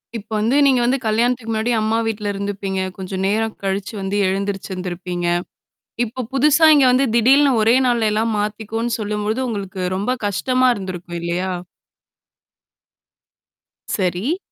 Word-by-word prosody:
இப்ப 220 -1 -7
வந்து 235 +7 +2
நீங்க 265 -2 +4
வந்து 250 +3 +2
கல்யாணத்துக்கு 230 +1 0
முன்னாடி 220 +2 0
அம்மா 220 +1 +1
வீட்ல 210 -2 -2
இருந்துப்பீங்க. 195 -1 -3 0.2
கொஞ்சம் 190 0 -4
நேரம் 220 +2 0
கழிச்சு 195 +2 -2
வந்து 195 +1 -2
எழுந்திரிச்சுிருந்திருப்பீங்க. 185 -2 -3 0.8
இப்ப 245 +2 -6
புதுசா 295 +4 +4
இங்க 285 -3 +5
வந்து 260 +2 +3
திடீர்னு 270 +5 +5
ஒரே 225 +3 +4
நாள் 235 -2 +2
எல்லாம் 220 +1 0
மாத்திக்கவோன்னு 220 +3 -2
சொல்லும்பொழுது 210 +3 -2
உங்களுக்கு 200 -4 -5
ரொம்ப 200 +6 -1
கஷ்டமா 255 +6 +1
இருந்திருக்கும் 185 -4 -6
இல்லையா? 175 +2 -2 2.4
சரி. 195 - -1
215 Hz, 125 wpm, -20 LUFS, 195-240 Hz, 2.4 s, இங்க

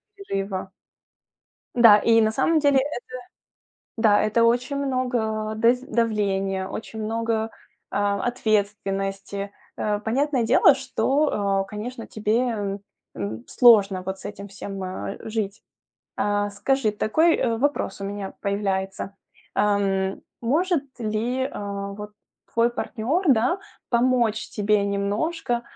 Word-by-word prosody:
перерыва. 195 - -4 1.0
Да, 230 -4 +8
и 225 +1 +4
на 220 0 +3
самом 325 +7 +2
деле 285 -2 +4
это 265 -2 -1 1.0
да, 215 -2 +4
это 215 +2 +2
очень 245 +4 +2
много, 240 -5 -1
э, - - -7
дез 240 +2 +4
давления, 200 -7 0
очень 220 0 -6
много, 225 0 -1 0.4
а, 200 0 0
ответственности. 200 -3 -1 0.3
Э, 210 -1 0
понятное 260 +3 0
дело, - - +6
что, 260 -7 +1
э, - - -10
конечно, 230 +3 -6
тебе, 215 +1 0
м, 205 -5 -2 0.4
м, 110 +3 -5
сложно 200 -6 +5
вот 190 0 -4
с - - -13
этим 200 -1 -7
всем, 195 -1 -6
э, 185 0 -5
жить. 215 -1 -3 0.5
А, 205 0 0
скажи, 215 +3 +1
такой, 315 +11 +2
э, 230 -2 0
вопрос 270 -7 -1
у - - -4
меня 200 -1 -5
появляется. 195 -1 -2 0.4
Эм, 195 -2 +1 0.2
может 310 +6 +1 0.2
ли, 230 +4 -1
э, - - -3 0.5
вот, 210 0 -8 0.4
твой 230 +1 +3
партнёр, 260 - -2
да, 260 - +3 0.3
помочь 235 -2 +2
тебе 210 -1 +1
немножко 225 +7 -1
215 Hz, 125 wpm, -24 LUFS, 200-245 Hz, 1.0 s, Да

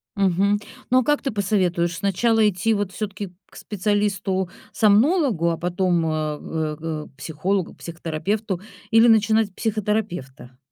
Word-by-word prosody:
Мгм. 200 +1 +2 0.3
Но 255 - +5
а 255 - +1
как 295 +2 +1
ты 270 - -2
посоветуешь, 185 -5 0
сначала 220 +3 +2
идти, 205 +3 +1
вот, 205 -3 -1
всё-таки 200 0 -5 0.2
к - - -21
специалисту-сомнологу, 205 - +1
а 165 - -2
потом, 175 -1 0
а, 155 -1 -1
в 155 0 -3
г 155 -1 -5
к 135 - -24
психологу, 170 +6 -2
к - - -22
психотерапевту 175 +5 -3 0.3
или 225 +1 +6
начинать 220 -1 +4
с - - -20
психотерапевта? 195 - -3
195 Hz, 140 wpm, -23 LUFS, 170-215 Hz, 0.3 s, или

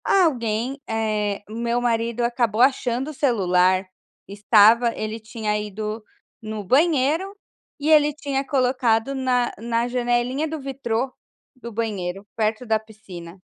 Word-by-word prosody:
Alguém 255 - +1
eh, 215 -2 -1
meu 235 +2 -1
marido 235 -1 0
acabou 235 -2 0
achando 260 0 +2
o - - -11
celular, 185 -8 +2 0.4
estava, 215 +3 +5
ele 215 +1 -4
tinha 220 -1 -3
ido 210 +1 -5 0.4
no 215 -1 -5
banheiro 310 - +2 0.4
e 295 +2 -1
ele 300 -1 +5
tinha 280 -2 -2
colocado 255 -2 +1
na 255 -2 +1
na 230 +1 -1
janelinha 245 +4 0
do 315 0 -5
vitrô 265 -2 -3 0.4
do 235 -2 -9
banheiro 200 -4 -3
perto 220 +2 -1
da 220 -1 +2
piscina, 195 -5 -12
235 Hz, 125 wpm, -23 LUFS, 215-260 Hz, 0.4 s, estava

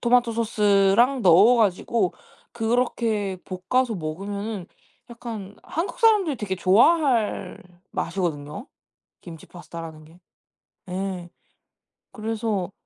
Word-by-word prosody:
토마토 240 -1 +3
소스랑 215 +2 +3
넣어 195 +7 +6
가지고 205 -1 +1 0.4
그렇게 225 -4 0
볶아서 225 +7 -1
먹으면은 200 +4 -5 0.4
약간 225 -4 -8
한국사람들이 395 - +1
되게 200 -4 -3
좋아할 225 - +2 0.3
맛이거든요 165 - -3 0.6
김치 165 -3 -11
파스타라는 165 -3 -10
게. 165 +3 -19 0.7
예. 185 -1 -4 0.8
그래서 215 -4 -3
210 Hz, 240 characters per minute, -24 LUFS, 185-235 Hz, 0.8 s, 넣어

